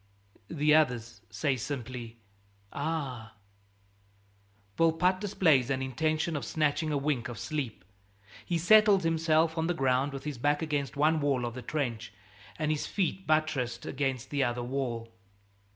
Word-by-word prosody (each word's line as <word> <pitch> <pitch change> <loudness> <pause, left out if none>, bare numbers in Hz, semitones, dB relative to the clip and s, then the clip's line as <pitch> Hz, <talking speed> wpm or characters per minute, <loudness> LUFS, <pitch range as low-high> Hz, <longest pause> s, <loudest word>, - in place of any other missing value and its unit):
The 150 -1 +2
others 120 -8 +1
say 140 -3 0
simply, 120 -2 -6 0.6
"Ah!" 140 -7 -3 1.4
Volpatte 165 +3 +2
displays 160 - +2
an 135 -1 0
intention 155 +5 -1
of 145 - -3
snatching 155 0 0
a 145 - +1
wink 140 -4 -1
of 120 - -7
sleep. 130 - -4 0.6
He 170 - -1
settles 205 +2 +5
himself 165 0 +2
on 160 - 0
the 175 - 0
ground 135 +1 +1
with 135 -1 -7
his 150 -5 -5
back 145 +4 +1
against 145 -4 -2
one 155 +2 +3
wall 135 -4 +1
of 120 - -4
the 125 - -7
trench 120 -6 -3 0.5
and 155 -1 0
his 150 - -2
feet 190 -1 -2
buttressed 140 -6 0
against 135 -2 -2
the 140 -2 +1
other 120 -1 -1
wall. 120 -3 -3
145 Hz, 145 wpm, -29 LUFS, 125-160 Hz, 1.4 s, settles